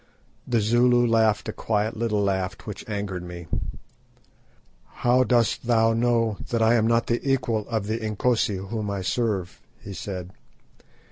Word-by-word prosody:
The 120 -3 +2
Zulu 120 +3 +4
laughed 110 -2 +2
a - - -3
quiet 110 +1 -1
little 110 -2 0
laugh 95 -2 -1
which - - -6
angered 100 -3 -3
me. 90 -1 -8 1.5
"How 125 +1 +3
dost 120 -1 +1
thou 115 -1 +4
know 115 -2 +1
that 115 - 0
I 110 +1 +5
am 110 -2 +3
not 115 0 +2
the 120 - 0
equal 120 -6 0
of 110 -4 -1
the 110 +2 -2
Inkosi 110 0 0
whom 105 +2 -4
I 100 -2 -3
serve?" 100 -3 -1 0.2
he 100 - -9
said. 90 -2 -6
110 Hz, 150 wpm, -25 LUFS, 100-120 Hz, 1.5 s, I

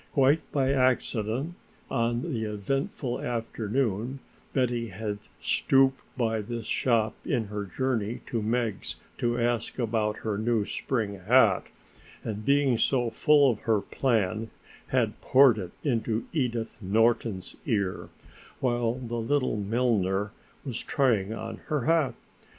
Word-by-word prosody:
Quite 140 +3 +3
by 135 -1 +2
accident 130 +2 +1 0.4
on 120 +1 0
the 120 -10 -2
eventful 120 +4 -2
afternoon 115 +1 -1 0.3
Betty 120 -3 0
had 105 +1 -4 0.2
stooped 135 0 +3 0.2
by 115 -3 +1
this 115 +1 -5
shop 115 -3 +1
in 115 - 0
her 105 -1 -3
journey 120 0 -2
to 115 - -2
Meg's 110 -2 -1 0.2
to 120 0 +1
ask 120 -1 0
about 110 -3 0
her 105 -2 -1
new 110 -2 +1
spring 105 -6 -2
hat, 105 0 +4 0.6
and 105 -1 -4
being 140 -2 +3
so 120 -2 +2
full 145 -2 +5
of 110 - -5
her 110 -2 +2
plan 110 -3 0 0.4
had - - 0
poured 130 -4 +6
it 90 -3 -5
into 115 -4 0
Edith 120 -7 -2
Norton's 110 -1 +1
ear, 100 -7 -1 0.5
while 120 -2 +1
the 120 -2 -4
little 130 -1 +1
milliner 105 -2 +1 0.3
was 125 -4 -3
trying 115 -8 +1
on 115 0 -5
her 150 -2 0
hat. 160 0 +2
115 Hz, 130 wpm, -28 LUFS, 110-130 Hz, 0.6 s, poured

